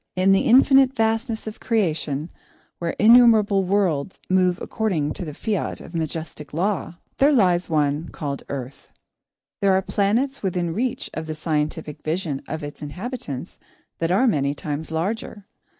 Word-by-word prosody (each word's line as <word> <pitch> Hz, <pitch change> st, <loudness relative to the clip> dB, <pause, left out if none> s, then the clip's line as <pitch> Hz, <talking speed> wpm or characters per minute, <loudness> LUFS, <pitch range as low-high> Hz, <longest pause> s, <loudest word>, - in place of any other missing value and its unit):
In 185 Hz, +1 st, +3 dB
the 195 Hz, -, +3 dB
infinite 270 Hz, +2 st, +6 dB
vastness 225 Hz, 0 st, 0 dB
of 220 Hz, -1 st, -7 dB
creation, 165 Hz, -, -1 dB, 0.5 s
where 170 Hz, -1 st, -2 dB
innumerable 220 Hz, -3 st, +6 dB
worlds 185 Hz, -4 st, 0 dB
move 185 Hz, -1 st, +3 dB
according 165 Hz, -10 st, -1 dB
to -, -, -4 dB
the 150 Hz, -, -6 dB
fiat 210 Hz, -1 st, -2 dB
of -, -, -12 dB
majestic 160 Hz, -2 st, -5 dB
Law, 185 Hz, 0 st, -1 dB, 0.2 s
there 280 Hz, +2 st, +5 dB
lies 185 Hz, -9 st, +3 dB
one 150 Hz, 0 st, 0 dB
called 140 Hz, -2 st, -5 dB
Earth. 135 Hz, -1 st, -7 dB, 0.7 s
There 195 Hz, -1 st, +4 dB
are 190 Hz, -, +3 dB
planets 230 Hz, +9 st, 0 dB
within 175 Hz, -3 st, -1 dB
reach 245 Hz, +5 st, -2 dB
of 160 Hz, 0 st, -5 dB
the 155 Hz, -, -4 dB
scientific 150 Hz, -1 st, -2 dB
vision 155 Hz, -3 st, -2 dB
of 155 Hz, +1 st, -5 dB
its 145 Hz, 0 st, -8 dB
inhabitants 165 Hz, -, -6 dB, 0.4 s
that 165 Hz, -, 0 dB
are 195 Hz, +9 st, +3 dB
many 145 Hz, -, +1 dB
times 150 Hz, +1 st, -5 dB
larger. 195 Hz, +5 st, -3 dB
180 Hz, 150 wpm, -23 LUFS, 155-215 Hz, 0.7 s, infinite